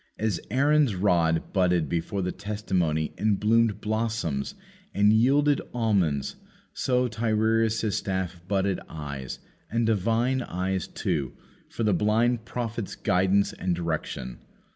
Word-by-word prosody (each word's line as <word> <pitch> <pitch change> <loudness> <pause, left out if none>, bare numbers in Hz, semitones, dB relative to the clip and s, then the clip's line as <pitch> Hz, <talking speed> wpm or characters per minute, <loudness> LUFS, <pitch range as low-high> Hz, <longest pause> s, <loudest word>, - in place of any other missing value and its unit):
As 105 -6 0
Aaron's 140 -1 +3
rod 85 -4 +1
budded 90 -5 +2
before 90 +5 -2
the 90 - -1
testimony 95 -6 -1
and 105 -2 +2
bloomed 110 -1 +2
blossoms 110 -10 -2 0.4
and 105 +1 +5
yielded 140 +5 +3
almonds, 95 - +1 0.4
so 125 -1 +1
Tiresias' 110 -1 +1
staff 95 -3 -3
budded 95 -1 0
eyes, 70 -4 -6 0.3
and 115 +1 +1
divine 115 +4 +1
eyes 95 -3 -2
too, 70 -3 -2 0.4
for 115 - -3
the 105 -2 +3
blind 110 +5 +2
prophet's 115 -4 -4
guidance 95 0 +2
and 90 -1 -1
direction. 80 -7 -4
105 Hz, 120 wpm, -26 LUFS, 90-115 Hz, 0.4 s, and